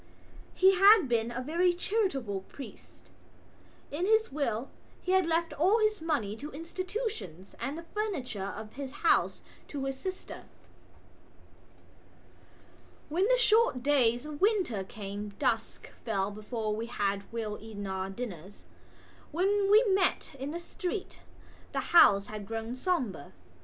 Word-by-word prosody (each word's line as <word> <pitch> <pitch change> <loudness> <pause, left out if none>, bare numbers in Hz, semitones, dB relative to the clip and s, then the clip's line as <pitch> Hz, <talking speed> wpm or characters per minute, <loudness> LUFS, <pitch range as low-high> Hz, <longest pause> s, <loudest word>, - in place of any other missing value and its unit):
He 380 +1 +6
had 395 -3 +7
been 230 -1 +1
a 255 +2 -4
very 345 +5 +2
charitable 320 - -1
priest; 275 - -12 0.8
in 335 +6 -1
his 440 +1 +3
will 265 -3 -2 0.3
he 365 - -3
had 375 -2 +4
left 330 0 0
all 375 +8 +3
his 430 -4 +1
money 285 -11 -1
to 290 +5 -7
institutions 330 - -5
and 270 +6 -3
the 335 - -7
furniture 260 - -3
of 215 0 -8
his 275 -1 -6
house - - +3 0.2
to 275 -2 -4
his 270 0 -2
sister. 375 +3 -6 2.6
When 360 +6 +2
the - - +4
short 445 - +3
days 255 -3 +3
of 300 0 -7
winter 380 - +2
came 205 +1 -7
dusk - - -1
fell 200 -3 -1
before 215 +1 -3
we 225 +2 -4
had 200 -4 -2
well 220 -2 -4
eaten 210 -2 -7
our 190 0 -3
dinners. 195 -3 -7 0.7
When 395 +4 +2
we 430 +3 +7
met 385 -7 +1
in 270 +2 -4
the 325 - -4
street 365 +3 -5 0.5
the - - 0
houses 200 -12 +7
had 210 -2 -7
grown 225 +1 -4
sombre. 255 - -2
275 Hz, 135 wpm, -30 LUFS, -, 2.6 s, had